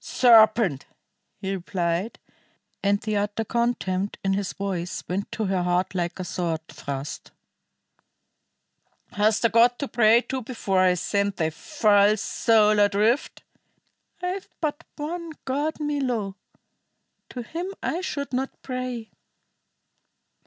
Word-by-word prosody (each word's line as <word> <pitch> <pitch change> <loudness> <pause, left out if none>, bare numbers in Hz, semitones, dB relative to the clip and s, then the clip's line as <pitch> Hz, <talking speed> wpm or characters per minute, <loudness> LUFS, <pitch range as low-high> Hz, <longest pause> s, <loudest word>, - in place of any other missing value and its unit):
"Serpent!" 225 - +5 0.5
he 195 -1 -3
replied, 180 +2 -2 0.6
and 200 0 +2
the 215 -1 -2
utter 205 +2 -1
contempt 205 -5 -1
in 195 0 +1
his 195 -1 -1
voice 185 -3 -3
went 195 +3 -3
to 220 - -2
her 190 -2 0
heart 180 +1 0
like 175 0 -2
a - - -2
sword 165 -3 -3
thrust. 140 +1 -6 1.8
"Hast 215 +2 +2
a - - +5
God 235 +3 +4
to 280 - -3
pray 230 -1 +5
to 260 +1 -4
before 220 -5 -1
I 185 -1 +4
send 200 +2 0
thy 160 -2 0
false 210 - +3
soul 215 -2 +3
adrift?" 210 +6 +2 0.8
"I 360 - 0
have 380 +1 -5
but 310 0 -2
one 330 +2 -5
God, 290 +4 -1
Milo; 255 -10 -1 0.9
to 245 - -6
Him 335 +9 -5 0.2
I 345 - -1
should 280 -7 -4
not 265 +2 -2
pray." 255 -3 -4
215 Hz, 125 wpm, -25 LUFS, 190-255 Hz, 1.8 s, Serpent